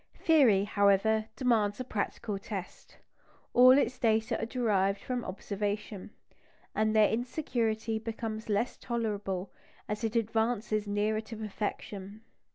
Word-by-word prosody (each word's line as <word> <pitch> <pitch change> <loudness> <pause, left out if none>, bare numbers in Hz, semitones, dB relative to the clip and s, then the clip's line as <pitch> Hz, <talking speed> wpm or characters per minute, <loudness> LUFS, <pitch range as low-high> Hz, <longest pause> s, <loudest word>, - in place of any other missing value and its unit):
Theory, 265 - +4
however, 205 +2 +3
demands 220 -5 +1
a - - -2
practical 210 -2 -3
test. 195 -2 -8 0.6
All 255 +2 +8
its 255 -2 0
data 220 -1 +2
are 225 - -2
derived 200 -5 +1
from 250 +1 -3
observation; 205 +1 -4 0.6
and 215 0 +1
their 215 -1 +6
insecurity 225 -3 -1
becomes 220 0 -5
less 210 +4 0
tolerable 205 -6 -3 0.4
as 210 +2 -4
it 225 0 -1
advances 220 -1 0
nearer 210 +1 0
to 225 0 -9
perfection. 205 -1 -5
220 Hz, 120 wpm, -30 LUFS, 205-230 Hz, 0.6 s, All